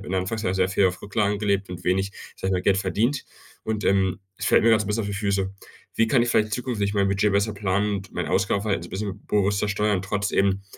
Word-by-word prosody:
Anfangs 95 +4 -2
sehr 95 -2 +1
viel 95 +1 +3
auf 90 0 -5
Rücklagen 105 0 0
gelebt 100 -2 0
und 90 - -7
wenig, 95 +2 +1 0.2
sage 95 - -3
ich - - 0
mal, 90 - 0
Geld 95 0 +3
verdient. 110 +8 0 0.4
Und, 110 -1 -2
ähm, 95 -1 +2 0.2
es - - -4
fällt - - +4
mir 115 - +5
grad 110 -1 +5
so - - -4
'n - - -6
bisschen 110 +2 0
auf 100 - -4
die 100 - -3
Füße. 100 -1 -1 0.4
Wie 115 - +3
kann 125 0 +3
ich 120 - -1
vielleicht 110 -2 +2
zukünftig 115 -5 -2
mein 100 -1 +2
Budget 100 +1 +2
besser 100 +2 +1
planen 100 +1 0
und 95 0 -10
mein - - -2
Ausgabenverhalten 100 +2 0
so - - -8
'n - - -22
bisschen 100 0 -5
bewusster 100 0 +1
steuern 100 -2 +1
trotz 100 +1 -2
eben, 100 0 +1
100 Hz, 245 wpm, -24 LUFS, 95-105 Hz, 0.4 s, mir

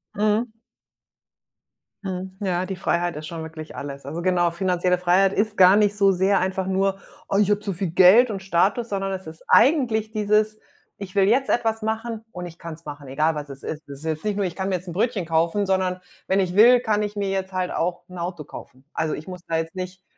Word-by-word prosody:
Mhm. 215 +3 +1 1.5
Mhm. 185 0 -5
Ja, 185 -2 0
die 190 - -4
Freiheit 175 -2 -1
ist 150 0 -7
schon 165 -1 -6
wirklich 160 -2 -9
alles. 140 0 -7
Also, 155 +5 -5
genau, 175 -1 +2
finanzielle 180 0 +1
Freiheit 180 +2 +3
ist 210 +1 0
gar 185 +1 +7
nicht 205 -1 +3
so 200 -1 +4
sehr 190 +2 +2
einfach 190 0 -1
nur: 195 0 0 0.3
„Oh, 195 - +1
ich 210 -1 +3
habe 205 0 +2
zu 205 -1 -3
viel 175 -1 -3
Geld 190 +8 +7
und 195 -3 -5
Status“, 195 +6 +1
sondern 195 -1 -2
es 190 0 -6
ist 160 +1 -10
eigentlich 235 -7 +3
dieses: 215 0 +1 0.4
„Ich 200 -1 -9
will 195 - +4
jetzt 265 +4 +2
etwas 225 -2 +1
machen 225 +1 -3
und 180 0 -6
ich 175 -1 -11
kann's 165 0 -9
machen, 145 -1 -8
egal, 155 +4 0
was 150 -1 -5
es 135 0 -10
ist.“ 155 0 -5
Das 140 -1 -9
ist 160 - -11
jetzt 155 +2 -3
nicht 210 -1 0
nur: 200 -1 0
„Ich 175 - -4
kann 190 0 -2
mir 190 - +1
jetzt 180 +1 -6
'n 170 - -6
Brötchen 210 -1 0
kaufen“, 165 +5 +1
sondern: 185 -1 0 0.3
„Wenn 195 +1 +2
ich 180 -1 -2
will, 240 +3 +7
kann 210 -3 0
ich 210 0 -4
mir 200 -1 -1
jetzt 190 -1 -3
halt 185 -1 -1
auch 175 +1 -2
'n 180 - -10
Auto 170 -2 -4
kaufen. 130 -1 -12
Also, 160 -1 -1
ich 155 - -7
muss 180 -1 -8
da 165 - -1
jetzt 165 +1 -4
nicht 185 0 -6
185 Hz, 230 wpm, -23 LUFS, 170-205 Hz, 1.5 s, gar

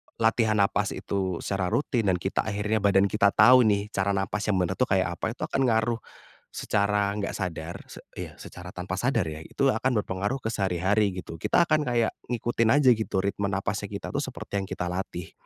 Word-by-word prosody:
latihan 110 -1 +2
nafas 100 -1 +1
itu 95 -3 -3
secara 95 -2 -1
rutin 115 0 0
dan 95 - +3
kita 95 +2 -3
akhirnya, 105 +1 0
badan 100 -1 +3
kita 100 -1 +3
tahu 125 -2 +7
nih 105 0 0
cara 100 0 0
nafas 100 +2 -2
yang 105 - +2
benar 90 +1 -1
tuh 125 - +3
kayak 95 -3 0
apa, 115 +2 -2
itu - - -6
akan 135 - -1
ngaruh 115 0 +1 0.5
secara 100 -1 0
enggak 105 -1 -2
sadar. 85 -3 -4
Sec - - -12 0.2
iya, - - -6
secara 90 0 -10
tanpa 90 +1 -4
sadar 120 0 +1
ya, 75 - -7
itu 135 -1 +1
akan 125 -5 +1
berpengaruh 100 +8 -3
ke 115 - -2
sehari-hari 100 0 +1
gitu. 85 -3 -7
Kita - - +3
akan 155 -3 +2
kayak 120 -2 +1 0.2
ngikutin 120 -1 0
aja 145 -3 +5
gitu 110 -5 +1
ritme 100 +1 -1
nafasnya 100 0 -2
kita - - -6
tuh - - -2
seperti 100 - -5
yang 95 - -3
kita 90 -1 -4
latih. 90 -2 -5
100 Hz, 200 wpm, -26 LUFS, 95-115 Hz, 0.5 s, tahu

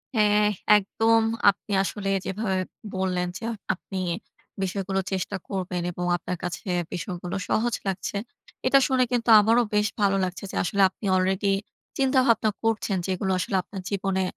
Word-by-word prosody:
হ্যাঁ, 210 -1 +4 0.3
একদম। 225 +3 +2 0.3
আপনি 200 +1 -3
আসলে 195 0 -3 0.2
যেভাবে 190 -1 -1 0.4
বললেন, 185 -1 0
যা 230 - -4 0.3
আপনি 190 +1 -7 0.6
বিষয়গুলো 190 0 -1
চেষ্টা 190 +1 -2
করবেন 180 -2 -2
এবং 175 +1 -4
আপনার 180 +1 -5
কাছে 175 0 -4 0.3
বিষয়গুলো 180 -1 -4
সহজ 235 +2 +1
লাগছে। 195 +1 -2 0.5
এটা 275 +1 +6
শুনে 260 -2 +3
কিন্তু 240 -1 0
আমারও 225 +3 +4
বেশ 210 0 +3
ভালো 195 -1 +3
লাগছে। 185 +1 -4
যে - - -8
আসলে 200 +3 0
আপনি 195 - -11
আলরেডি 190 +2 +1 0.5
চিন্তাভাবনা 260 -5 +3
করছেন। 220 -3 0
যে - - -5
এগুলো 190 +1 -1
আসলে 180 +2 -2
আপনার 195 0 -8
জীবনে 195 -1 0
195 Hz, 145 wpm, -25 LUFS, 185-220 Hz, 0.6 s, এটা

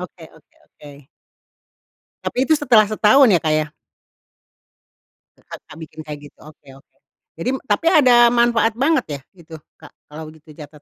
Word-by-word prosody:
oke 180 -2 -11
oke 160 - -25
oke. 145 -2 -17 1.2
Tapi 260 +4 -2
itu 315 - +3
setelah 230 -8 +3
setahun 220 +5 +3
ya 190 - +4
Kak 155 -1 -2
ya? 155 0 0 1.8
Kakak - - -14
bikin 155 0 -12
kayak 150 -1 -8
gitu, - - -50
oke 155 -2 -18
oke. - - -29 0.4
Jadi 255 +11 -4
tapi 215 +11 0
ada 245 -7 +5
manfaat 235 -1 +1
banget 310 +4 +1
ya, - - -20
itu, 170 -3 -15 0.3
Kak, - - -15 0.2
kalau 155 +1 -11
gitu 155 0 -20
catat? 150 -1 -14
190 Hz, 150 wpm, -18 LUFS, 155-245 Hz, 1.8 s, ada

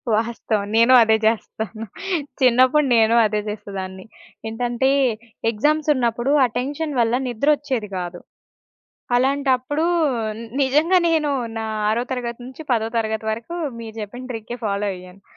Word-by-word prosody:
వాస్తవం 220 -2 -1
నేను 235 +3 +6
అదే 220 0 +4
జేస్తాను. 220 0 -2 0.6
చిన్నప్పుడు 255 +4 +5
నేను 225 +1 +4
అదే 210 0 0
జేసేదాన్ని. 190 -3 -6 0.4
ఏంటంటే 240 +3 0 0.6
ఎగ్జామ్స్ 300 +7 +1
ఉన్నప్పుడు 240 +2 0
ఆటెన్షన్ 280 +6 -3
వల్ల 235 +1 +2
నిద్రొచ్చేది 260 -2 0
గాదు, 175 -1 -5 1.0
అలాంటప్పుడు 275 +3 +1 0.8
నిజంగా 305 +7 +3
నేను 305 -3 +1 0.3
నా 225 - -3 0.2
ఆరో 230 +3 +1
తరగతి 240 -2 -3
నుంచి 260 +4 -10
పదో 225 -2 +1
తరగతి 220 -1 -1
వరకు 230 +10 -5 0.2
మీరు 225 -1 -8
చెప్పిన 245 +5 -7
ట్రికే 225 +1 -6
ఫాలో 200 0 -1
అయ్యాను. 180 +1 -13
235 Hz, 115 wpm, -21 LUFS, 220-265 Hz, 1.0 s, నేను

